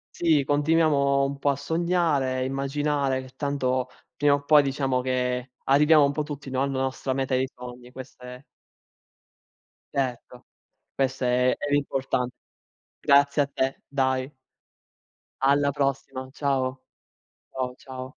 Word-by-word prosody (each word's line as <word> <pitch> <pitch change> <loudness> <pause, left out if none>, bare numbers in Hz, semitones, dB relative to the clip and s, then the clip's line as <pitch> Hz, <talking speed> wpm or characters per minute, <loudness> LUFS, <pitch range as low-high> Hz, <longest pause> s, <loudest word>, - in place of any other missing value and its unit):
Sì, 160 -5 +3
continuiamo 145 -2 +2
un 140 0 -4
po' 145 - +1
a 140 - +2
sognare, 145 -4 0
immaginare, 135 0 -1
che 130 0 -14
tanto 130 -3 -1 0.3
prima 145 -1 +3
o 145 - -6
poi 150 0 +6
diciamo 135 -2 0
che 125 0 -2
arriviamo 150 +2 +5
un 140 - +1
po' 150 - -2
tutti, 145 -2 -7
no, 130 0 0
alla 135 -1 -1
nostra 130 0 -2
meta 135 -1 -2
dei 130 +1 +1
sogni, 125 0 -11
questa 125 -1 -11
è 130 - -15 1.5
Certo, 125 -2 -3 0.5
questo 135 -1 -1
è 125 +1 +2
è 145 - -4
l'importan 135 -3 0 0.7
grazie 140 +1 +4
a 140 - +1
te, 135 -1 -2
dai. 130 0 -1 1.1
Alla 140 +1 +3
prossima, 135 -1 -2
ciao. 135 -2 -1 0.7
Ciao, 125 -1 -3
ciao. 130 0 -8
135 Hz, 130 wpm, -25 LUFS, 130-145 Hz, 1.5 s, poi